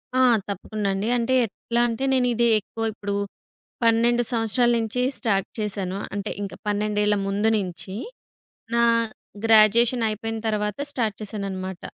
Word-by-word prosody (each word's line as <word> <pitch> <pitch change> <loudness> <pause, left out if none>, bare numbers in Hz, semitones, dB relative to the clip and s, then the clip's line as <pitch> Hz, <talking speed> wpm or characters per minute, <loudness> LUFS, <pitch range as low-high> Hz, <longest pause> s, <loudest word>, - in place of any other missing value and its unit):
ఆ! - - +3 0.3
తప్పకుండ 205 +2 -4
అండి. 195 +3 -2
అంటే 235 +2 0
ఎట్లా 235 +2 -2
అంటే, 230 +2 -3
నేనిది 245 -2 +2
ఎక్కువ 225 +2 -7
ఇప్పుడు 200 -1 -4 0.7
12 235 +1 +3
సంవత్సరాల 235 +1 +2
నుంచి 225 +2 -2 0.2
స్టార్ట్ 195 -5 0
చేసాను. 195 -3 -2 0.2
అంటే 200 -1 -3
ఇంకా 195 -3 -5
పన్నెండేళ్ల 210 0 +1
ముందు 205 +3 +1
నించి. 190 -1 -5 0.8
నా 235 - +4 0.6
గ్రాడ్యుయేషన్ 225 +2 +5
అయిపోయిన 225 +1 -4
తర్వాత 210 -1 -1
స్టార్ట్ 225 -7 -1
చేసాననమాట. 190 -3 -5
215 Hz, 125 wpm, -24 LUFS, 200-230 Hz, 0.8 s, గ్రాడ్యుయేషన్